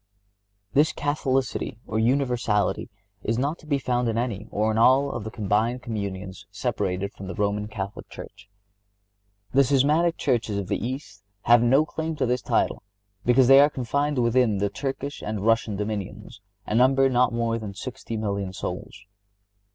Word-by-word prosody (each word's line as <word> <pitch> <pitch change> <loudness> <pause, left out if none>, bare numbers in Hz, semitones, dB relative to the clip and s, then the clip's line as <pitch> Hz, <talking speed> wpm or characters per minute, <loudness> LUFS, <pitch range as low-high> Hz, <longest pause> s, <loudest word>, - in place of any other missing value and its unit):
This 150 +3 +4
Catholicity, 135 -5 -1
or 110 - -2
universality, 120 -5 +1 0.3
is 115 +2 -1
not 145 +6 -1
to 155 - -16
be 145 -2 +2
found 125 -2 0
in 115 - -1
any, 115 -3 -2
or 110 +1 0
in 110 - 0
all, 135 +4 +5
of 120 - -5
the 110 - -5
combined 110 +3 0
communions 100 -4 -5
separated 100 0 -2
from 95 - -9
the 90 - -5
Roman 105 0 -1
Catholic 100 -2 -6
Church. 100 0 -11 1.0
The 140 +1 +6
Schismatic 150 +6 +2
churches 115 -6 0
of 95 -2 -4
the - - -1
East 120 -5 -6 0.2
have 120 0 +6
no 135 +6 +4
claim 160 +1 -4
to 140 -3 0
this 125 0 0
title - - 0 0.4
because 125 +1 +5
they 135 +1 +8
are 145 +1 +6
confined 140 +2 -1
within 120 -3 +2
the 100 +1 0
Turkish 135 +4 -4
and 105 -1 -4
Russian 115 -2 +2
dominions, 105 0 -5 0.2
and 110 - +1
number 135 +1 +5
not 125 -1 +3
more 115 0 -1
than 105 -3 -7
sixty 115 0 -6
million 100 -3 -2
souls. 100 - -6
115 Hz, 165 wpm, -25 LUFS, 105-135 Hz, 1.0 s, they